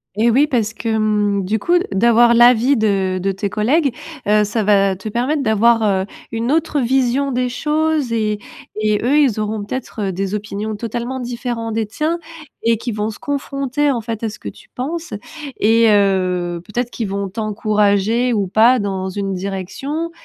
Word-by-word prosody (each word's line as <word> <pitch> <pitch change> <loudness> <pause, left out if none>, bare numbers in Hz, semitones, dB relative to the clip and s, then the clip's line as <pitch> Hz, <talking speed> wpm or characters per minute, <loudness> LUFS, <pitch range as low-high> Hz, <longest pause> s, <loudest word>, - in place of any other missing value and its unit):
Eh 230 +3 +3
oui, 285 +5 +4
parce 225 -6 0
que 225 -2 -2
mmh, 205 -2 +1
du 215 +4 0
coup, 345 +11 +2
de 355 - -1
d'avoir 235 +4 +4
l'avis 240 +3 +5
de 195 -5 +1
de 195 +1 0
tes 195 +1 -3
collègues, 265 - +1 0.3
heu, 210 0 +4
ça 215 +2 -1
va 195 -1 +3
te 200 +4 -7
permettre 265 +6 0
d'avoir, 225 +1 +3
heu, 195 -2 +1 0.3
une 230 +3 -1
autre 315 -1 +1
vision 265 +2 +1
des 250 0 0
choses 300 -1 0
et 215 -2 0 0.4
et 215 -1 +1
eux, 280 +5 +3
ils 255 -8 +2
auront 215 0 -2
peut-être 235 +1 -5
heu, 190 - -1
des 195 +2 -3
opinions 210 +1 -4
totalement 240 +4 -4
différents 240 -2 -4
des 220 0 -1
tiens, 310 +10 -2 0.5
et 230 0 +3
qui 235 +2 -4
vont 210 0 -2
se - - -12
confronter 280 0 -1
en 240 - -2
fait 225 0 -5
à 220 - 0
ce 210 - -11
que - - -6
tu - - -16
penses. 315 +5 -4 0.5
Et 225 +2 +4
heu, 185 -4 +1
peut-être 240 +3 -3
qu'ils 225 -4 -4
vont 200 0 -3
t'encourager 215 +2 +1
ou 200 -4 0
pas 230 +6 +4
dans 190 -2 -2
une 195 0 -3
direction 200 - -4
225 Hz, 185 wpm, -18 LUFS, 205-250 Hz, 0.5 s, l'avis